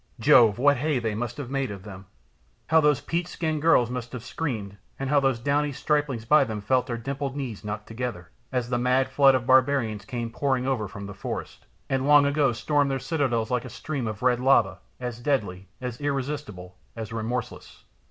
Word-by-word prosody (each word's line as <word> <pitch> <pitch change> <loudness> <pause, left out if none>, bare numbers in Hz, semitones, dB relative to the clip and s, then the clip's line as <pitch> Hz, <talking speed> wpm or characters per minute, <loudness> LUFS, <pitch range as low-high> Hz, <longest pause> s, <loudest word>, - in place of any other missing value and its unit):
Jove, 115 -4 +6
what 145 +2 +4
hay 150 +2 0
they 115 -3 -1
must 120 +2 -4
have 135 -3 -6
made 135 -1 -1
of 100 -2 -8
them! 95 -2 -10 0.6
How 160 +1 +5
those 150 -3 +3
peach 170 +1 -2
skinned 160 -4 -2
girls 125 -7 +4
must 125 0 -5
have 120 -3 -6
screamed 110 -10 -4 0.2
and 135 0 -3
the 135 -4 +3
downy 145 +1 +1
striplings 140 -4 -1
by 150 +4 +5
them 110 -5 -4
felt 125 +5 +1
their 120 -2 -3
dimpled 135 +2 -4
knees 130 -7 -5
knock 105 0 -5
together, 115 -6 -5 0.2
as 125 -2 -2
the 120 - +1
mad 130 +2 +2
flood 135 0 +5
of 125 -2 -1
barbarians 130 -5 +3
came 120 0 -4
pouring 130 0 0
over 130 -6 -1
from 100 +1 -8
the 100 - -7
forest, 95 -9 -6 0.2
and 135 +1 0
long 145 -1 +7
ago 140 -2 +2
stormed 145 +4 +1
their 135 - 0
citadels 130 -5 -1
like 125 -2 0
a - - -8
stream 140 -6 -4
of 110 +1 -5
red 125 -1 +3
lava, 125 -6 +3 0.2
as 125 -2 -5
deadly, 100 -9 -1
as 125 0 -6
irresistible, 135 -10 -4 0.2
as 115 -1 -6
remorseless!" 115 +2 -5
125 Hz, 195 wpm, -26 LUFS, 115-140 Hz, 0.6 s, long